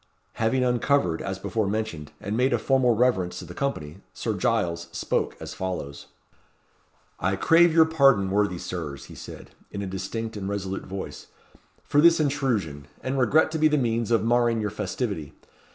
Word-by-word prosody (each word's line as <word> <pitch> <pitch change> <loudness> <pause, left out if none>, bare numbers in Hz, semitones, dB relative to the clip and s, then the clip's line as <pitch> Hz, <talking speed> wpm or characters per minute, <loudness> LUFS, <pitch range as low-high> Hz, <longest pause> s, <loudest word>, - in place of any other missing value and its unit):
Having 120 +3 +2
uncovered, 125 - +1
as 95 -1 -4
before 110 +1 -2
mentioned, 100 -8 -3
and 100 +2 -3
made 125 +2 +2
a - - +3
formal 125 0 +2
reverence 110 -7 +1
to - - -7
the - - -9
company, 95 - -3 0.2
Sir 110 - -2
Giles 90 -4 0
spoke - - -2
as - - -7
follows: 90 -7 -5 1.1
"I 95 +3 +1
crave 165 - +5
your 160 0 +6
pardon, 135 -12 +3
worthy 105 -2 +1
Sirs," 75 -6 -6
he - - -12
said, - - -10 0.2
in 100 - -5
a - - -3
distinct 95 +4 -4
and 100 -1 -4
resolute 95 -1 -4
voice, 95 0 -7 0.6
"for 145 0 +3
this 170 +1 +6
intrusion, 115 - -1 0.2
and 135 +1 -1
regret 155 +5 +3
to 160 - -2
be 155 - +5
the 150 0 +2
means 115 -3 0
of 115 -3 +2
marring 120 -1 +2
your 105 -2 -2
festivity. 100 - -4
110 Hz, 170 wpm, -25 LUFS, 95-130 Hz, 1.1 s, your